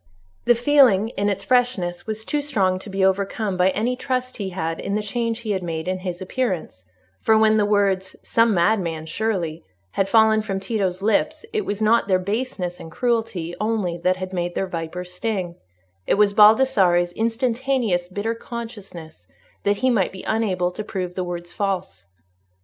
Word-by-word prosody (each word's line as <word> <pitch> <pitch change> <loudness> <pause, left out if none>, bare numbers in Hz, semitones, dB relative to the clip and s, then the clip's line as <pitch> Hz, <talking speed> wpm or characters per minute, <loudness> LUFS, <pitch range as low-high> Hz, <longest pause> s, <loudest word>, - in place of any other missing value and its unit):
The 240 - +5
feeling, 240 -5 +4
in 205 -3 -1
its 200 0 -2
freshness, 235 -9 0
was 220 0 -4
too 295 -1 -1
strong 195 -11 0
to 205 - -10
be 195 0 +1
overcome 195 +1 0
by 180 +1 +3
any 225 +6 0
trust 255 0 -3
he 200 -3 -3
had 165 -3 -3
in 200 - -2
the 210 - -1
change 230 +2 -2
he 220 -3 -3
had 190 -2 -1
made 165 -1 -4
in 185 0 -1
his 180 -1 -5
appearance; 185 - -3 0.4
for 220 - +4
when 220 0 +4
the 205 -1 +2
words 195 -2 +1
"some 230 0 +3
madman, 170 -4 +1
surely," 170 -3 -2 0.3
had 195 0 0
fallen 220 0 +5
from 195 -3 -3
Tito's 190 -2 -2
lips, 220 - +1
it 430 -2 -1
was 205 +1 -2
not 225 0 +3
their 185 -2 +4
baseness 185 -2 -3
and 165 - -10
cruelty 225 -7 -1
only 210 -5 0
that 185 +2 +2
had 185 0 -6
made 175 -1 -2
their 195 - 0
viper 175 0 -5
sting—it 170 - -5
was 205 0 +3
Baldassarre's 210 -5 +5
instantaneous 230 -4 0
bitter 205 +5 -2
consciousness 205 - -9 0.3
that 205 0 +1
he 260 - +4
might 200 -6 +1
be 190 - -9
unable 190 -5 0
to 215 - -6
prove 185 -4 -4
the 185 - -2
words 175 -1 -6
false. 185 - -3
195 Hz, 175 wpm, -22 LUFS, 180-225 Hz, 0.4 s, The